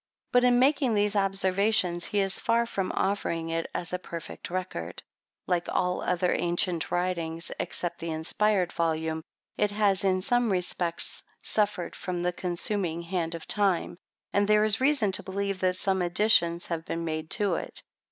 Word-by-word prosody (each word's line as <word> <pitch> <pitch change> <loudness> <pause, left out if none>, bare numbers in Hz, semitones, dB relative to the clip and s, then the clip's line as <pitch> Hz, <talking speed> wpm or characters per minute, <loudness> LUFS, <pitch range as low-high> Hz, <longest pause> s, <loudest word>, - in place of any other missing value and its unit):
But 245 0 +4
in 245 -1 +4
making 265 -2 +3
these 205 0 +1
observations, 195 -2 +2
he 205 - 0
is 195 -1 -1
far 235 0 +1
from 195 -5 -3
offering 170 -4 -1
it 165 0 -2
as 175 +1 -4
a 180 - -1
perfect 170 -2 -8
record. 180 - -5 0.4
Like 175 -2 -1
all 180 0 0
other 180 0 0
ancient 175 -1 0
writings, 170 -2 0
(except 175 - 0
the 165 - -5
inspired 180 +4 0
volume,) 160 -1 -1 0.4
it 210 - +2
has 205 -2 +2
in 185 -1 +2
some 245 +1 +2
respects 175 -2 +2 0.2
suffered 205 -5 0
from 180 -1 -4
the 180 0 -1
consuming 175 -1 -1
hand 170 -1 -3
of 165 - -9
time; 195 -4 +1 0.3
and 200 0 +2
there 210 0 +4
is 215 +2 +3
reason 265 -7 +2
to - - 0
believe 195 0 -3
that 185 -1 +1
some 190 0 0
additions 175 -2 +3
have 165 -2 -4
been 165 0 -4
made 155 -1 -4
to 205 -4 +1
it. - - -2
185 Hz, 165 wpm, -27 LUFS, 170-205 Hz, 0.4 s, But